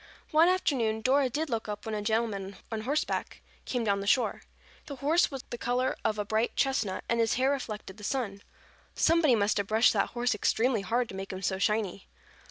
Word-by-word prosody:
One 315 +2 +6
afternoon 240 -12 +1
Dora 265 +3 +3
did 305 +6 -2
look 225 -4 -3
up 210 0 -5
when 220 - -4
a 210 - -2
gentleman 205 -3 -1
on 220 -1 -2
horseback 285 +7 -2 0.3
came 245 -2 -1
down 200 -2 +1
the 200 - -5
shore. 250 +4 +2 0.5
The 280 - -6
horse 300 +6 +2
was 270 -3 -6
the 240 - -5
color 250 +2 0
of 215 - 0
a 210 - -2
bright 220 +3 0
chestnut 245 -8 0
and 235 - 0
his 225 -1 +2
hair 260 +2 +2
reflected 215 -7 -5
the 210 - -12
sun. 205 -4 -2 0.5
Somebody 320 -6 +4
must 205 -1 +1
have 200 -1 -1
brushed 220 +2 +4
that 200 - +1
horse 245 +1 +2
extremely 225 +2 +1
hard 235 +6 0
to - - -7
make 195 0 -6
him 190 0 -6
so 190 0 0
shiny. 200 -2 -1
225 Hz, 205 wpm, -29 LUFS, 205-260 Hz, 0.5 s, One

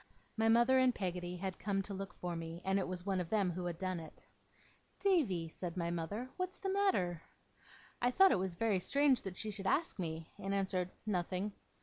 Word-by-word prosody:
My 225 0 +3
mother 240 +3 +5
and 255 -1 +4
Peggotty 180 -2 -3
had 190 0 -4
come 195 -1 0
to 200 - -5
look 195 +1 -5
for 175 -1 -4
me, 165 +1 -6
and 195 +1 +2
it 190 - -1
was 180 0 -4
one 195 -2 +1
of 170 - -5
them 200 -4 +2
who 175 +1 -4
had 175 -2 -3
done 185 -1 -2
it. 160 -1 -12 0.7
'Davy,' 265 - +2
said 170 +2 -6
my 170 -1 0
mother. 175 +9 -3
'What's 365 0 -2
the 385 -1 -2
matter?' 185 - +2 0.8
I 245 - +4
thought 385 +9 +6
it - - +3
was 185 -2 -2
very 210 0 +2
strange 275 +6 +4
that 185 -2 -6
she 215 - -3
should 195 -1 -5
ask 310 - +1
me, 160 -2 -4
and 195 0 -1
answered, 185 -2 0 0.2
'Nothing. 190 0 -1
190 Hz, 210 wpm, -35 LUFS, 175-225 Hz, 0.8 s, thought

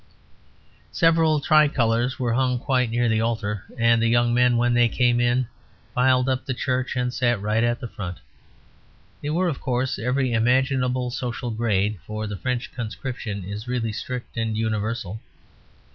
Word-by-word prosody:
Several 165 -2 +3
tricolours 130 -5 +3
were 120 -4 0
hung 125 0 +1
quite 125 -1 +1
near 120 +2 0
to 120 - +2
the 110 0 +2
altar, 110 -3 -2
and 115 0 +4
the 115 - +3
young 120 0 +3
men, 125 0 +4
when 120 +1 +2
they 120 -1 +4
came 120 -1 +2
in, 120 +1 +2 0.5
filed 125 0 +3
up 130 -1 0
the 130 - -3
church 130 +1 -1
and 125 0 -1
sat 120 -4 +1
right 105 +3 0
at 120 +1 +1
the 120 - -5
front. 90 -5 -6 1.0
They 145 - -3
were, 175 +4 +1
of 155 -6 -3
course, 125 0 -1
of 110 - -5
every 130 -1 +1
imaginable 125 +1 +1
social 125 -1 -4
grade; 105 -3 0
for 110 0 -4
the 105 -1 -4
French 125 +4 -3
conscription 115 -3 -5
is 105 +5 -6
really 120 -3 -1
strict 125 +2 -6
and 110 -1 -1
universal. 110 -1 -2
120 Hz, 170 wpm, -24 LUFS, 115-130 Hz, 1.0 s, and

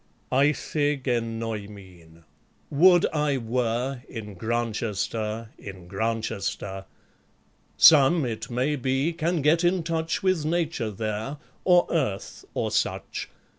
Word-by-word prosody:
ei'/qe 145 +1 +1
genoi/mhn... 105 -8 -5 0.5
would 175 +4 +6
I 150 -2 +1
were 120 +2 -1
* - - -25
In 105 -3 -7
Grantchester, 110 +1 -2
in 95 -3 -10
Grantchester! 100 -1 -3 0.9
Some, 150 0 +7
it 110 -2 -4
may 130 +5 0
be, 135 +5 0
can 165 -1 -1
get 165 +4 +4
in 175 0 +2
touch 165 +1 -2
With 185 -5 +2
Nature 160 -7 -1
there, 110 +6 -4 0.3
or 180 -1 +5
Earth, 130 - -2
or - - -1
such. - - -2
125 Hz, 110 wpm, -26 LUFS, 110-155 Hz, 0.9 s, Some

